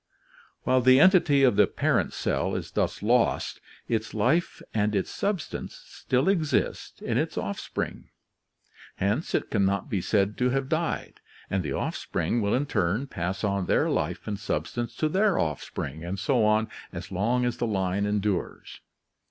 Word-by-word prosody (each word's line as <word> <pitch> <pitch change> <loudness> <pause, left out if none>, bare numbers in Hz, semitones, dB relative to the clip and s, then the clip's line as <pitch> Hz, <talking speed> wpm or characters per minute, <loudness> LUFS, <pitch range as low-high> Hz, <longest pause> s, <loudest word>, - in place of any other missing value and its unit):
While 130 0 +3
the 130 +1 +6
entity 165 -6 +5
of 125 -6 +4
the - - +6
parent - - +1
cell - - -1
is - - -4
thus - - -1
lost, 120 +2 +1 0.3
its 110 -1 -2
life 155 +11 +1
and 105 -1 +1
its 95 - -1
substance 200 -5 -3
still 130 +4 -1
exist 170 -6 0
in - - 0
its - - -2
offspring, - - -4 0.9
hence 105 - 0
it - - -1
can 100 -3 +2
not 100 0 0
be 100 - 0
said 100 +2 +1
to 125 0 +3
have 135 +1 0
died, 165 +2 -2 0.3
and 95 - +1
the 75 -5 -3
offspring 120 - -1
will 100 -1 +1
in 135 +3 +1
turn 100 +1 0
pass 95 -6 -4
on 100 -3 0
their - - +2
life 85 +3 -2
and 105 -2 -3
substance 120 +2 -3
to 155 - +1
their 195 +4 +2
offspring 75 -1 -3
and 90 +3 -4
so 125 +1 +2
on 110 +1 +3 0.2
as - - -7
long 115 +7 +1
as 120 -1 -1
the 120 - -1
line 95 -1 0
endures. 105 -2 -2
110 Hz, 165 wpm, -27 LUFS, 100-135 Hz, 0.9 s, the